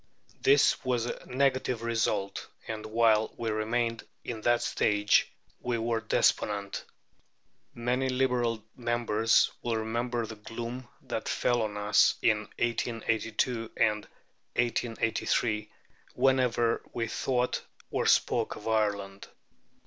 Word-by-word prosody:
This 140 +1 +4
was 125 -3 0
a - - -5
negative 130 -3 +1
result, 110 -4 -1 0.2
and 110 -1 -5
while 110 -1 +3
we 115 -1 -2
remained 115 +2 -1 0.2
in 115 -2 -5
that 120 +1 +2
stage 105 0 +2 0.3
we 120 -1 -1
were 115 0 -1
despondent. 100 -2 +1 0.9
Many 125 +3 0
Liberal 125 -4 +1
members 120 -2 +2
will 115 -2 -1
remember 115 +2 -1
the 110 0 -9
gloom 120 +4 -6 0.2
that - - -4
fell 120 -1 +1
on 105 -2 -2
us 105 0 +4
in 105 -2 +2
1882 115 0 -1
and 105 -1 +2 0.5
1883 115 -2 0 0.5
whenever 125 -3 +2
we 115 -1 -1
thought 125 +2 0 0.3
or - - 0
spoke - - +2
of 105 - -9
Ireland. 100 -3 -1
115 Hz, 110 wpm, -29 LUFS, 110-120 Hz, 0.9 s, This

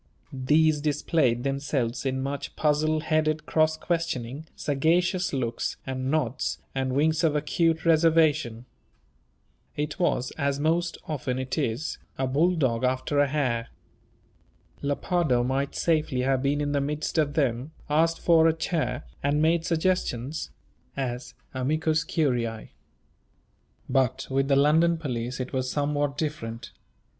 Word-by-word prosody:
These 150 +3 +3
displayed 145 -4 +1
themselves 135 -3 -1
in 130 0 -1
much 140 +1 -4
puzzle 155 +1 +1
headed 155 -1 0
cross 155 0 +2
questioning, 160 -5 -3
sagacious 175 +5 +1
looks, 120 -4 -2
and 130 0 -3
nods, 155 -1 0 0.2
and 130 -1 -1
winks 160 +4 +2
of 155 -2 +3
acute 165 +2 +1
reservation. 155 -7 +3 1.1
It 150 +4 -3
was, 130 -8 +1
as 140 -1 0
most 170 +3 0
often 130 -4 -2
it 130 0 -3
is, 140 0 -2 0.2
a 130 - 0
bulldog 135 -4 +1
after 130 +3 0
a 145 - +4
hare. 125 -5 -1 1.1
Lepardo 145 -2 +1
might 135 +3 -1
safely 155 -6 +1
have 130 0 +1
been 140 +2 +1
in 145 0 -1
the 140 -1 +1
midst 150 +3 -2
of 145 -2 +1
them, 130 -1 0 0.2
asked 165 +3 +2
for 165 -1 +5
a 160 - +4
chair, 155 -5 -2 0.2
and 145 +1 +1
made 165 +2 +2
suggestions. 160 -5 -1 0.5
as 125 -2 -4 0.2
"amicus 155 +4 0
curiæ." 120 -9 -1 1.2
But 130 -3 +1
with 135 0 +1
the 140 - +3
London 160 +4 +4
police 125 -5 -4
it 130 0 -4
was 130 -1 -1
somewhat 145 0 -1
different. 115 -7 -4
145 Hz, 130 wpm, -26 LUFS, 130-160 Hz, 1.2 s, for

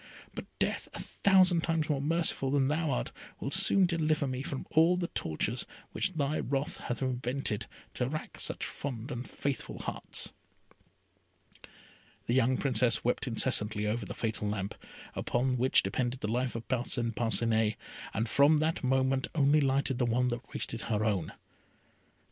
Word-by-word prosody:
But - - -6
death, - - 0
a - - -5
thousand 185 -3 +4
times 165 -2 0
more 145 -3 0
merciful 155 -3 +1
than 135 -1 +2
thou 160 +1 0
art, - - -1 0.3
will 135 - -3
soon 195 +1 +5
deliver 155 -4 +1
me 130 -1 -3
from 135 0 -5
all 165 +3 +5
the 175 -1 -2
tortures 80 - -2 0.2
which 185 - -1
thy 150 -1 0
wrath 140 +2 -1
hath 120 +2 -3
invented, 125 -3 -2 0.3
to 125 - -1
rack 155 +2 -6
such - - -2
fond 130 -1 -5
and 125 -1 -5
faithful 140 -1 -3
hearts." - - -4 1.9
The 120 - 0
young 130 0 +3
Princess 125 -3 +2
wept 125 +2 0
incessantly 110 -3 +1
over 110 +2 -1
the - - -6
fatal 110 -2 -2
lamp, 100 -1 -2 0.6
on 125 +1 +2
which 130 +1 +3
depended 125 0 -2
the - - -1
life 125 +3 -1
of 115 - -5
Parcin 120 -2 0
Parcinet, 115 -1 +2 0.4
and 110 +3 -1
from 140 +6 +5
that 155 +1 0
moment 130 0 +2
only 145 0 +4
lighted 135 -1 +1
the 125 - +2
one 125 +2 +2
that 120 +2 -5
wasted 115 - -3
her 110 -1 +1
own. 95 -7 0
130 Hz, 160 wpm, -31 LUFS, 115-145 Hz, 1.9 s, soon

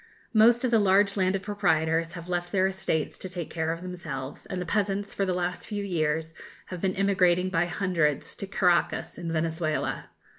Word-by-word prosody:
Most 235 +2 +5
of 250 - +1
the 225 - +5
large 200 0 +4
landed 190 0 +1
proprietors 165 -5 +1
have 170 0 -8
left 175 -1 -2
their 190 -2 +3
estates 190 -5 -1
to 185 - -5
take 175 -3 -6
care 160 -1 -1
of 165 +1 -4
themselves; 155 -7 -6
and 185 - -4
the 180 - -3
peasants, 200 0 -1
for 195 - -1
the 185 - +1
last 180 0 -2
few 205 -2 -3
years, 160 -3 -1 0.4
have 180 -2 -6
been 190 -1 0
emigrating 185 -2 +2
by 170 -1 +2
hundreds 175 -6 0
to 195 - -5
Caraccas, 180 -4 +1
in 170 -1 -4
Venezuela. 160 -1 -1
180 Hz, 185 wpm, -27 LUFS, 165-195 Hz, 0.4 s, Most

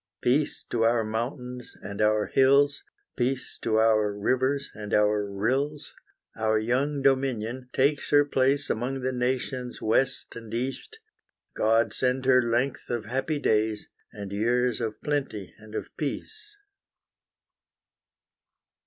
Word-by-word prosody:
Peace 140 +5 +1
to 120 - 0
our 115 0 +3
mountains 125 +3 -5
and 100 +1 -5
our 105 0 +3
hills, 140 +2 +4 0.3
Peace 130 +1 -1
to 110 - 0
our 110 -2 +3
rivers 130 +7 0
and 105 -1 -3
our 105 -1 +2
rills; 135 +9 -1 0.4
Our 110 0 +1
young 135 +6 0
Dominion 130 -2 0
takes 145 +3 +1
her 145 0 +5
place 140 +1 +1
Among 130 +4 -2
the 130 +1 -1
nations 125 0 -2
west 125 +4 0
and 115 -2 -9
east, 135 - -4 0.6
God 115 +1 +2
send 130 0 0
her 130 -1 +6
length 120 +3 -1
of 120 -2 -2
happy 135 +6 -1
days, 110 -5 0 0.2
And 100 -2 -8
years 120 +3 +1
of 110 -2 -3
plenty 140 -10 -2
and 110 0 -12
of - - -3
peace! 420 - -5
125 Hz, 125 wpm, -27 LUFS, 110-135 Hz, 0.6 s, her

